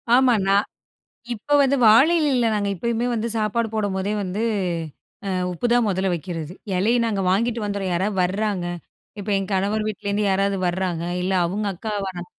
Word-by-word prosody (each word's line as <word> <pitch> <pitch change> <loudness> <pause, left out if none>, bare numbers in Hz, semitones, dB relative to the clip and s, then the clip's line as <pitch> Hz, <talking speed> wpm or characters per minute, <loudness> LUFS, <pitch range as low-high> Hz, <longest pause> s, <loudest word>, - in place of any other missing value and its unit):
ஆமா, 255 -1 +5
நான் 200 +2 +3 0.7
இப்ப 290 +7 0
வந்து 275 0 +3
வாழை 270 +10 +6
இலைல 260 -6 +2
நாங்க 205 -1 0
எப்பயுமே 235 +5 -1
வந்து 230 0 -1
சாப்பாடு 220 +2 0
போடும்போதே 205 -1 -1
வந்து, 190 +4 -3 0.9
அ - - -1 0.2
உப்பு 180 +8 -2
தான் 240 -3 +3
முதல்ல 190 0 0
வெக்கிறது, 170 -1 -5 0.2
இலைய 225 +6 +2
நாங்க 205 -4 -1
வாங்கிட்டு 230 +3 +1
வந்துர்றோம், 200 -2 -2
யாராவது 190 +3 -1
வர்றாங்க. 195 -1 -1 0.5
இப்ப 205 +1 -5
எங்க 195 0 -3
கணவர் 210 +3 0
வீட்லருந்து 210 0 -2
யாராவது 195 +1 +1
வர்றாங்க. 175 -2 -2 0.2
இல்ல, 190 +1 -1
அவங்க 205 +4 -2
அக்கா 215 +4 -5
வரா 180 -2 -6
205 Hz, 160 wpm, -22 LUFS, 190-225 Hz, 0.9 s, வாழை